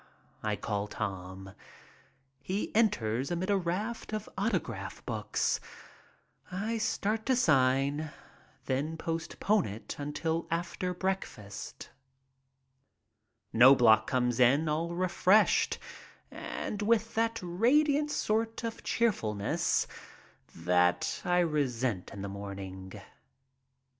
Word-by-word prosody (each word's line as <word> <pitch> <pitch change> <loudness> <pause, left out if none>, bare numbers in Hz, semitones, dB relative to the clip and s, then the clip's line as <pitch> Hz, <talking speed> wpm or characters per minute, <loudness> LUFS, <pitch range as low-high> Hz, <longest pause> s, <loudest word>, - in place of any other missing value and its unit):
I 105 -1 0
call 100 0 -2
Tom. 95 -2 -5 0.9
He 195 +3 -3
enters 130 - +1
amid 180 +3 -1
a - - +4
raft 200 +6 -3
of 215 -1 -3
autograph 125 - -2
books. 110 -2 -1 0.9
I 215 +5 -2
start 215 0 0
to 260 - +4
sign, 140 - +2 0.6
then 145 +5 -1
postpone 165 +5 0
it 105 +3 -7
until 160 +3 -2
after 180 +2 -2
breakfast. 185 - -4 1.6
Knobloch 115 -3 +7
comes 125 -2 +1
in 135 +6 +5
all 165 +3 -1
refreshed 185 +3 +3 0.5
and 210 - -5
with 225 +1 +2
that 230 0 0
radiant 285 - +3
sort 225 -3 -1
of 230 -1 -4
cheerfulness 110 - +1 0.7
that 90 +1 +1
I 180 0 +3
resent 130 - -1
in 100 0 -7
the - - -3
morning. 95 -1 -7
155 Hz, 100 wpm, -30 LUFS, -, 1.6 s, Knobloch